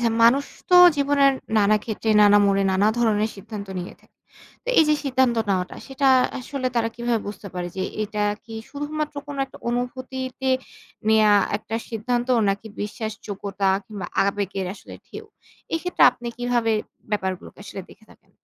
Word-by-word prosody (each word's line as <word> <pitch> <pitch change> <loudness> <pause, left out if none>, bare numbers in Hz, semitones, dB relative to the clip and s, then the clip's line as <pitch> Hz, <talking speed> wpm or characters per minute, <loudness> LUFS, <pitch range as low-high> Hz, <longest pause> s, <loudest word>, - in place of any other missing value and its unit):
হ্যাঁ, 230 -1 +1
মানুষ 265 +5 +5 0.2
তো 360 - +8 0.2
জীবনের 280 -1 +4 0.3
নানা 210 +1 +4
ক্ষেত্রে, 220 0 -4
নানা 205 0 +7
মোড়ে, 195 0 +3
নানা 195 +2 +3
ধরনের 220 -2 +2
সিদ্ধান্ত 200 +1 -8
নিয়ে 175 - -8
থাকে। - - -29 0.5
তো - - -8
এই 320 - +7
যে 305 - +5
সিদ্ধান্ত 260 -3 +2
নেওয়াটা 185 -2 -1
সেটা 270 0 +1 0.3
আসলে 260 +1 -4
তারা 225 -1 +2
কিভাবে 235 -1 0
বুঝতে 205 0 -8
পারে 175 -1 -3
যে 190 - -1 0.2
এটা 210 0 -3 0.2
কি 225 - -10 0.2
শুধুমাত্র 300 +1 -4
কোন 285 -1 -7
একটা 265 - -15
অনুভূতিতে 255 +1 -3 0.6
নেয়া 215 -1 +5 0.2
একটা 225 +2 -5
সিদ্ধান্ত 240 +2 -2 0.2
নাকি 195 +2 -2
বিশ্বাসযোগ্যতা 205 -2 -3 0.2
কিংবা 200 -4 -7 0.2
আবেগের 195 -1 -2
আসলে 200 - -12
ঢেউ? 435 - -9 0.5
এক্ষেত্রে 360 +2 0
আপনি 240 -1 -8
কিভাবে 240 -2 +1 0.4
ব্যাপারগুলোকে 190 -3 -3
আসলে 195 - -7
দেখে - - -18
থাকেন? - - -27
225 Hz, 155 wpm, -23 LUFS, 205-260 Hz, 0.6 s, তো